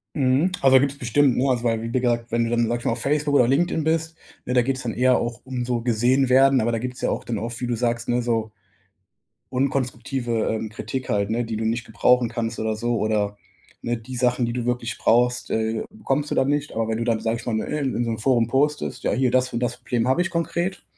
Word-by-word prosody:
Mhm, 135 +6 +2
also, 135 -1 +6
gibt’s 140 +1 0
bestimmt, 130 +2 +2
ne 135 +2 +2
also, 120 -2 0
wei 115 -2 0
wie 115 - -5
gesagt, 120 -2 0
wenn 115 0 +2
du 115 - -2
dann, 120 -1 +1
sage 120 +1 -1
ich 120 - -13
mal, - - +2
auf 115 - -4
Facebook 145 +1 +1
oder 125 -4 +5
LinkedIn 160 +4 +1
bist, 160 +1 0 0.3
ne, 125 - -2
da 125 - +5
geht’s 135 +1 -2
dann 115 -2 -3
eher 125 +1 +3
auch 120 -1 -3
um 130 -2 -3
so 120 -1 -1
gesehen 125 +3 +2
werden, 135 0 +5
aber 120 - 0
da 115 - -1
gibt’s 125 +1 -5
ja - - +1
auch - - -2
dann 115 -3 -3
oft, 115 +3 -5
wie 125 - -1
du 120 - 0
sagst, 115 0 -1
ne, 120 0 +2
so 115 -2 -1 1.0
unkonstruktive, 125 -3 -1
ähm, 110 0 -3
Kritik 130 +4 -5
halt, 100 -3 0
ne, 120 +2 0
die 110 -1 -4
du 110 - -2
nicht 115 +2 -1
gebrauchen 120 +2 +2
kannst 115 0 -3
oder 110 0 -1
so, 120 +2 -1
oder, 105 -2 0 0.4
ne, 120 - -1
die 120 +3 -9
Sachen, 125 0 +1
die 115 - -3
du 120 -1 -3
wirklich 120 -2 -2
brauchst, 125 +1 +2
äh, 110 0 -1
bekommst 150 -9 -2
du - - 0
dann 135 +1 +2
nicht. 145 0 -1
Aber 115 0 -1
wenn 110 - -1
du 115 - -2
dann, 115 -2 +1
sage 115 +1 -1
ich - - -11
mal, 120 - -2
ne, 110 - -1
in 130 -4 -1
so 115 - -2
'nem 110 - -3
Forum 120 0 +2
postest: 145 +4 0
„Ja, - - +1
hier, 130 -1 +1
das 130 0 +1
und 115 - -1
das 125 0 -1
Problem 120 -1 -1
habe 130 +7 +3
ich 180 - -1
konkret, 170 +2 -2
120 Hz, 255 wpm, -23 LUFS, 115-130 Hz, 1.0 s, also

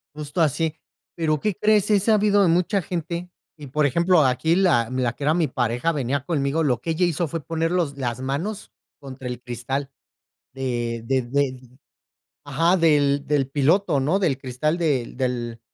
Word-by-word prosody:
Justo 150 +2 -3
así. 160 +1 +1 0.4
Pero, 155 -3 0
¿qué 210 +2 -1
crees? 210 -1 +3
He 205 -2 +4
sabido 205 -1 +3
de - - +4
mucha 180 +4 +2
gente 170 +1 -4 0.3
y, 150 -2 -10
por 150 +3 +1
ejemplo, 170 +4 +3
aquí 130 +6 +2
la 150 -12 +3
la 130 -2 0
que 140 - -9
era 150 +2 +3
mi 165 -3 +1
pareja, 125 +3 0
venía 140 -2 -2
conmigo, 150 0 0
lo 125 -6 0
que 165 - -2
ella 170 +3 +1
hizo 170 0 -1
fue 160 +1 -5
poner 165 0 -1
los 165 -6 -1
las 120 -3 -3
manos 160 +11 -4 0.3
contra 130 -2 -8
el 125 0 -5
cristal 130 +3 -4 0.6
de 120 -3 -3
de 130 0 +1
de 130 +1 -1 0.9
ajá, 165 +6 +2
del 145 -4 +2
del 145 -3 +1
piloto, 150 +3 +2
¿no?, 155 +9 +1
del 145 -9 0
cristal 135 +5 -2
del 140 -9 -1
del 120 -3 -3
145 Hz, 175 wpm, -23 LUFS, 130-170 Hz, 0.9 s, He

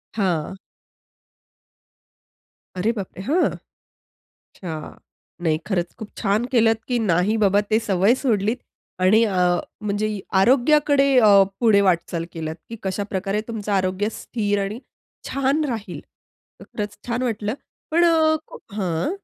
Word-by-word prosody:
हां. 190 -3 -1 2.2
अरे 215 +6 +1
बापरे! 190 -1 -6
हां! 320 - +2 0.9
अच्छा. 160 -4 -9 0.5
नाही 160 -2 +2
खरंच 180 -4 -2
खूप 220 - -7
छान 210 +5 +1
केलंत, 225 -1 +3
की 245 - 0
नाही 180 +6 +2
बाबा 200 +1 +4
ते 220 - +4
सवय 195 +4 +3
सोडलीत 220 -3 +1 0.5
आणि 220 +4 +5
अ, 180 -4 +2 0.2
म्हणजे 210 0 -1 0.3
आरोग्याकडे 275 +5 +4
अ, 215 - +6 0.3
पुढे 220 -4 +5
वाटचाल 170 -1 -1
केलंत. 160 -1 -4
की 230 - -6
कशाप्रकारे 195 +1 -2
तुमचं 215 -2 -4
आरोग्य 190 +1 0
स्थिर 205 -3 -1
आणि 210 +4 -5 0.5
छान 275 +3 +1
राहील. 220 -8 -5 0.6
तर - - -11
खरंच 210 -1 -4
छान 245 +1 -1
वाटलं. 220 -2 -2 0.4
पण 340 +2 +4
अ, 320 -1 +4
को - - -11 0.2
हां. 175 - -1
210 Hz, 125 wpm, -22 LUFS, 190-235 Hz, 2.2 s, अ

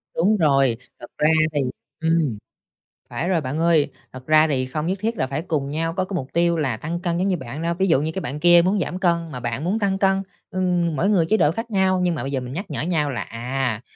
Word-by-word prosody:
Đúng 205 +6 +3
rồi. 135 -7 +3 0.2
Thật 120 - -9
ra 150 - +3 0.2
thì 145 - +1 0.4
ừm, 160 -8 +1 0.7
phải 175 - -3
rồi 175 -4 +2
bạn 140 +3 -3
ơi, 165 -3 +3 0.2
thật 130 0 -10
ra 155 0 +5
thì 130 -4 0
không 150 +5 -3
nhất 190 - -1
thiết 225 +1 -1
là - - 0
phải 140 +3 -3
cùng 155 -5 -2
nhau 165 +3 -2
có 185 +1 -1
cái 190 - -5
mục 135 -7 -3
tiêu 170 0 +2
là 135 -8 -1
tăng 165 +7 -4
cân 175 -1 -1
giống 185 +2 0
như 185 -3 +1
bạn 130 +3 -7
đâu. 170 +1 0
Ví 190 +3 0
dụ 160 -5 +3
như 155 +2 -1
cái 190 - -4
bạn 145 -1 -4
kia 175 +1 +7
muốn 195 +2 +2
giảm 180 0 -3
cân 170 -3 0
mà 125 - -5
bạn 120 +3 -3
muốn 195 +6 0
tăng 195 -2 0
cân, 195 0 +2 0.3
ừm, 180 -3 0
mỗi 180 +8 +1
người 185 -6 +3
chế 220 +7 +2
độ 150 - +3
khác 225 +6 -5
nhau 190 -2 +2
nhưng 175 -2 +1
mà - - -4
bây 135 - -4
giờ 135 - 0
mình 125 0 -7
nhắc 185 +8 -4
nhở 145 - -2
nhau 155 -2 0
là, 120 -6 -3
à, 120 0 -3
165 Hz, 265 wpm, -22 LUFS, 140-185 Hz, 0.7 s, kia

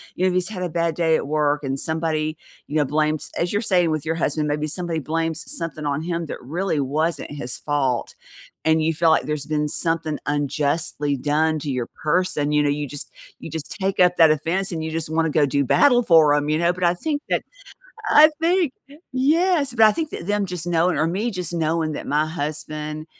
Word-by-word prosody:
you 185 - 0
know, - - +5
if - - -2
he's 185 +1 0
had 195 -4 -6
a 180 - -2
bad 170 0 -1
day 160 -1 +2
at - - -1
work 150 0 +1
and 135 0 -2
somebody, 160 -1 -1 0.3
you 150 - -6
know, 150 -2 +3
blames- 150 -1 -1
as 175 - 0
you're 205 - 0
saying 180 -5 +2
with 155 -1 -2
your 160 - 0
husband- 150 -1 0
maybe 150 +1 -1
somebody 170 0 -3
blames 165 +2 -2
something 160 -3 -5
on 145 +1 -1
him 170 -1 -3
that - - -7
really 160 +5 -2
wasn't 155 +5 -1
his 125 -4 -5
fault 135 -5 -1 0.5
and 160 0 +3
you 165 +1 +1
feel 165 +1 +3
like 160 - +3
there's 150 -2 -3
been 150 -1 0
something 160 -1 -2
unjustly 145 0 -1
done 155 +3 +1
to 145 -1 -4
your 125 -2 -2 0.2
person. 155 -2 +1
You 150 0 +3
know, 145 - +2
you 145 0 -2
just 145 +1 -8 0.3
you - - -8
just 160 -2 -6
take 195 0 -1
up 180 -1 +4
that 165 -1 +7
offense 170 +6 -1
and 160 -2 -3
you 160 - -4
just 160 -1 -3
wanna 160 0 +1
go 150 -2 +3
do 140 +1 +1
battle 245 - +4
for 160 -7 +5
him, 145 0 0
you 155 +1 +1
know? 170 +1 +2
But 180 - -6
I 175 0 +4
think 290 - -3
that - - +1 0.7
I 305 +1 +8
think 340 -3 +2 0.4
yes. 295 +1 +2
But 225 -2 +6
I 215 - +5
think 320 +4 -3
that 170 - -7
them 205 0 0
just 180 -2 -5
knowing 175 +1 +2
or 160 - +2
me 200 +8 -1
just 180 -5 -5
knowing 160 -1 0
that - - -6
my 150 +1 +2
husband 155 0 -5
160 Hz, 220 wpm, -22 LUFS, 150-175 Hz, 0.7 s, I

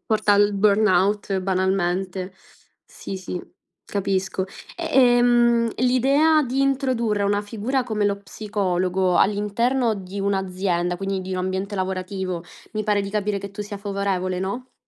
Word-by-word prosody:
porta 215 -1 +2
al 205 0 +4
burnout 200 -1 +2
banalmente. 185 0 -1 0.5
Sì, 195 - -8
sì, 180 -1 -5 0.4
capisco. 190 -1 -1 0.3
E - - -4
ehm, 240 -2 +4
l'idea 275 +6 +3
di 260 0 -1
introdurre 255 -6 +1
una 205 0 +1
figura 225 +6 -2
come 215 -3 -1
lo 200 - +1
psicologo 185 -3 0
all'interno 220 +4 +2
di 195 0 -6
un'azienda, 185 -3 -1
quindi 195 0 -2
di 185 0 -6
un 185 - -2
ambiente 190 +2 -2
lavorativo, 185 -1 -3 0.3
mi 215 -1 -2
pare 205 -1 +2
di 195 - -5
capire 210 -1 -1
che 200 0 -7
tu 205 +1 -6
sia 205 0 -7
favorevole, 195 -2 -2
no? 240 +7 -4
200 Hz, 135 wpm, -23 LUFS, 190-220 Hz, 0.5 s, al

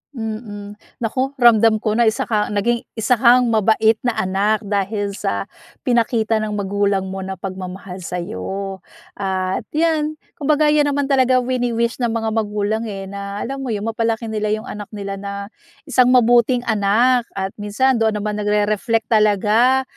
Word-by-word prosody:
Mm. 215 -3 -6 0.2
Naku, 260 +5 -1
ramdam 225 -3 +4
ko 215 - +1
na 230 +1 +3
isa 220 - +1
ka 210 -2 0
naging 210 +4 0 0.2
isa 225 +2 +1
kang 245 0 +5
mabait 220 0 +3
na 240 - 0
anak 200 +4 0
dahil 205 0 -1
sa 200 - -2 0.4
pinakita 230 -3 +1
ng 215 -1 -3
magulang 200 -1 0
mo 190 - -5
na 190 0 -5
pagmamahal 185 0 -7
sa'yo. 185 - -5 0.4
At 190 -1 -2
yan, 310 -1 +1 0.2
kumbaga 300 +1 +3
yan 295 -1 +3
naman 285 0 -1
talaga 255 -1 +3
wini-wish 240 -1 -1
ng 240 - +1
mga 225 -1 -1
magulang, 215 0 -1
eh, 195 -2 -5
na 200 0 -5
alam 270 +2 -5
mo 265 - -5
yun 210 -3 -2
mapalaki 225 0 -1
nila 215 -1 -1
yung 215 - -8
anak 210 -1 -7
nila 195 -1 -5
na 200 0 -6 0.5
isang 255 -4 +3
mabuting 245 0 +4
anak. 230 +3 +2
At 190 0 -2
minsan 240 +5 +1
doon 220 -1 +1
naman 210 0 -3
nagre-reflect 210 +2 0
talaga 215 +5 +3
220 Hz, 155 wpm, -20 LUFS, 205-240 Hz, 0.5 s, kang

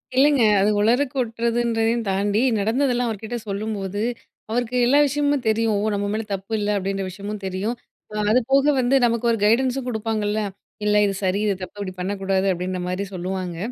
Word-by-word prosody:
இல்லங்க, 280 0 +4 0.2
அது 200 - +3
உளறி 235 +5 +3
கொட்டுறதுன்றதையும் 235 -1 0
தாண்டி, 200 +3 +1 0.2
நடந்ததெல்லாம் 245 +3 +1
அவர்கிட்ட 220 +2 -4
சொல்லும்போது. 205 -1 -3 0.5
அவருக்கு 245 +2 -1
எல்லா 280 +4 +5
விஷயமும் 285 -1 0
தெரியும். 220 0 +1
ஓ! - - -1
நம்ம 200 0 -1
மேல 220 +1 -1
தப்பு 195 +3 -5
இல்ல 205 0 -1
அப்பிடின்ற 195 0 -2
விஷயமும் 200 +3 -6
தெரியும். 190 +5 -2 0.4
அ 210 0 -1
அதுபோக 265 +4 +3
வந்து 255 +2 +2
நமக்கு 235 0 0
ஒரு 230 - +1
கைடன்ன்ஸும் 255 +3 +2
குடுப்பாங்கல்ல. 220 -2 -1 0.5
இல்ல 210 0 +3
இது 200 - 0
சரி, 190 +1 +1
இது 205 - +2
தப்பு, 185 +2 -7
இப்பிடி 190 -2 -4
பண்ணக்கூடாது 195 0 -1
அப்பிடின்ற 185 +1 -3
மாரி 185 +2 -2
சொல்லுவாங்க. 185 -1 -4
215 Hz, 160 wpm, -22 LUFS, 195-240 Hz, 0.5 s, எல்லா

